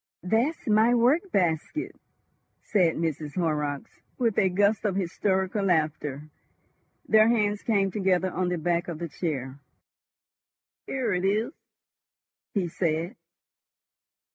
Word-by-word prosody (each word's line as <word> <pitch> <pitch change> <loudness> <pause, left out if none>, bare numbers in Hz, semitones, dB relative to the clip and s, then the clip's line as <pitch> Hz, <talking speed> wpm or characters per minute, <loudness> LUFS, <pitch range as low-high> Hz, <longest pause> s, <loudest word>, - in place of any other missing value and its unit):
"That's 230 - 0
my 220 +2 +4
work 290 +11 +2
basket," 175 - -1 0.7
said 180 -6 +2
Mrs. 155 -2 -3
Horrocks, 150 -5 -2 0.2
with 230 -5 +1
a 190 -3 +3
gust 200 +3 +2
of 205 -3 0
hysterical 190 +2 0
laughter. 155 -5 0 0.8
Their 215 0 +6
hands 210 -3 +1
came 200 -4 +1
together 185 -2 +1
on 180 0 -1
the 180 - -1
back 170 +2 0
of 170 -3 -5
the 170 +1 -4
chair. 140 -5 -4 1.3
"Here 250 -6 -1
it 180 0 -1
is!" 215 +8 0 1.0
he 190 -4 +1
said. 170 +4 -2
185 Hz, 115 wpm, -26 LUFS, 165-215 Hz, 1.3 s, Their